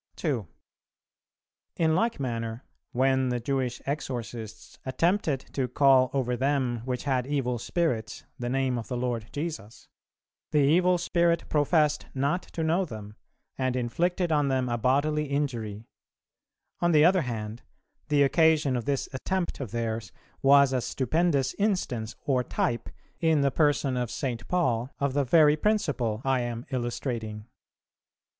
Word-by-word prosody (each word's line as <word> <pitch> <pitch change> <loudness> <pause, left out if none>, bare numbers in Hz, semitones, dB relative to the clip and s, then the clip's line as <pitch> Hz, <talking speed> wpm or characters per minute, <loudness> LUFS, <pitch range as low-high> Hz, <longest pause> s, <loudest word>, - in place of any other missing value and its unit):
2. 130 - -2 1.3
In 160 -1 +2
like 225 +2 +1
manner 115 -3 -3 0.3
when 130 0 +2
the 125 0 -1
Jewish 125 -1 -2
exorcists 120 -6 -5
attempted 160 0 +1
to 130 -2 0
"call 130 0 +4
over 125 -3 0
them 130 -2 0
which 125 -2 -3
had 130 -3 0
evil 130 -4 -1
spirits 125 -6 -2 0.2
the 120 0 -2
Name 130 -1 0
of 115 - -7
the 125 - -3
Lord 120 -3 -2
Jesus," 150 -8 -6 0.6
the - - 0
evil 175 +6 +4
spirit 170 -1 +1
professed 150 0 +2
not 140 +7 +1
to 165 - -5
know 165 +4 +2
them, 105 - -8 0.4
and 130 -1 0
inflicted 170 +9 0
on 145 -2 +2
them 130 -2 0
a 120 - 0
bodily 145 +5 +1
injury; 120 -7 -3 0.9
on 175 -1 +2
the 150 0 +6
other 185 +1 +5
hand, 115 -2 -5 0.5
the 145 -1 +4
occasion 150 -1 +3
of 120 - -3
this 135 -2 -1
attempt 180 +7 -2
of 135 -5 -4
theirs 110 -3 -3 0.3
was 140 0 +6
a 130 - +1
stupendous 140 +3 0
instance 155 - -1
or 130 -3 +2
type, 120 -1 -2 0.3
in 160 -3 +3
the 140 -1 +2
person 145 -2 +2
of 125 -2 -1
St. 120 -3 -4
Paul, 130 -9 0
of 140 -1 -1
the 145 0 +2
very 150 +2 +5
principle 145 - 0
I 135 -1 +2
am 120 0 -4
illustrating. 120 -4 -3
135 Hz, 145 wpm, -27 LUFS, 120-150 Hz, 1.3 s, the